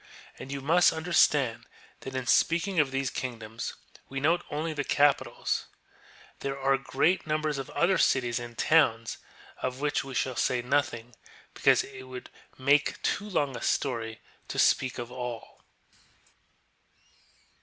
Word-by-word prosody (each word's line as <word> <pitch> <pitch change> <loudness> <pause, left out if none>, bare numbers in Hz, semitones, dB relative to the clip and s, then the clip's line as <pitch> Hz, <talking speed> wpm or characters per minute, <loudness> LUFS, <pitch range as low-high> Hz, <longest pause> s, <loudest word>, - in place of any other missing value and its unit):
And 130 - -8
y.QVlei&^ist 160 +5 +3
understand 150 -7 +2 0.3
that 135 0 -8
in 130 -1 -2
speaking 170 +7 +2
of 145 -3 +3
these 135 0 -2
kingdoms 115 -2 -5 0.3
we 135 - -3
note 160 +5 +2
only 155 +2 -2
the 145 -1 -2
capitals; 145 0 +1 0.7
there 135 0 -3
are 135 0 +3
great 140 +6 0
num 155 0 0
bers 150 -2 -1
of 135 - -6
other 180 +1 +2
cities 120 -5 +2
and 120 -1 -9
towns 115 -8 +2 0.4
of 130 0 -3
which 145 0 0
we 135 -1 -8
shall 130 0 0
say 125 0 0
nothing, 125 -3 -1 0.4
because - - +4
it 130 -1 -11
would 130 -1 -9 0.3
make 140 +2 +2
too 205 +1 -1
long 145 -8 0
a - - -6
story 115 -4 -1 0.3
to - - -6
speak 130 -1 +3
of 120 0 -6
all. 125 -2 -7
135 Hz, 145 wpm, -28 LUFS, 125-150 Hz, 0.7 s, because